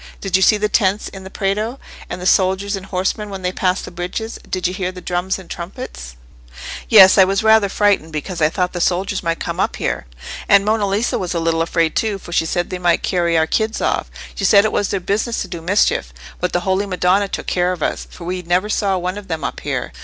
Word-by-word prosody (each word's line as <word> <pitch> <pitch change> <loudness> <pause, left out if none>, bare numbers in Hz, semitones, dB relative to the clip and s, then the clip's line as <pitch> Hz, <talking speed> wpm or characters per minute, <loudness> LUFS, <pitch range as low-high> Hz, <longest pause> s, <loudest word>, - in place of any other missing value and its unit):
Did 195 -2 -1
you 190 - +3
see 210 +2 +5
the 210 0 0
tents 205 -1 +1
in 195 -1 -10
the 190 - -9
Prato, 210 +6 -2 0.3
and 180 - -5
the 180 - -6
soldiers 190 +2 +2
and 195 0 -8
horsemen 195 +3 -2
when 195 -2 -7
they 180 - 0
passed 185 0 -1
the - - -9
bridges—did 185 +2 -5
you 180 - -4
hear 185 -1 -2
the 185 - -10
drums 180 +1 -2
and 190 -2 -12
trumpets?" 65 - -8 0.7
"Yes, 190 -4 +8
and - - +10
I - - +7
was 195 +2 0
rather 220 -2 +5
frightened, 200 -6 +1
because 165 +3 -5
I 155 - +4
thought 180 +1 -1
the 175 - -3
soldiers 190 +3 0
might 165 -1 -2
come - - -4
up - - 0
here. - - -3 0.4
And 200 0 +6
Monna 215 -1 +1
Lisa 205 +4 0
was 180 -1 -3
a - - +1
little 165 0 +1
afraid 165 -1 0
too, 215 -3 0
for 175 - -12
she 165 -1 +1
said 175 +1 -2
they 185 - -3
might 175 -1 +2
carry 170 -3 +1
our 160 - +3
kids 220 +7 -1
off; - - -1 0.2
she - - -6
said 200 +2 +6
it 215 - +1
was 205 - 0
their 195 - -1
business 215 +5 -1
to - - -8
do 175 -2 -7
mischief. 170 - +1 0.3
But 180 - -1
the 175 - 0
Holy 190 +2 0
Madonna 185 +1 +2
took - - -5
care 180 0 +1
of 175 -4 -4
us, - - -2
for 175 - -12
we 180 +1 -3
never 180 +4 0
saw 195 -2 +1
one 180 +3 -3
of 200 - -13
them 160 -4 -4
up - - -3
here. - - -3
185 Hz, 245 wpm, -19 LUFS, 175-200 Hz, 0.7 s, and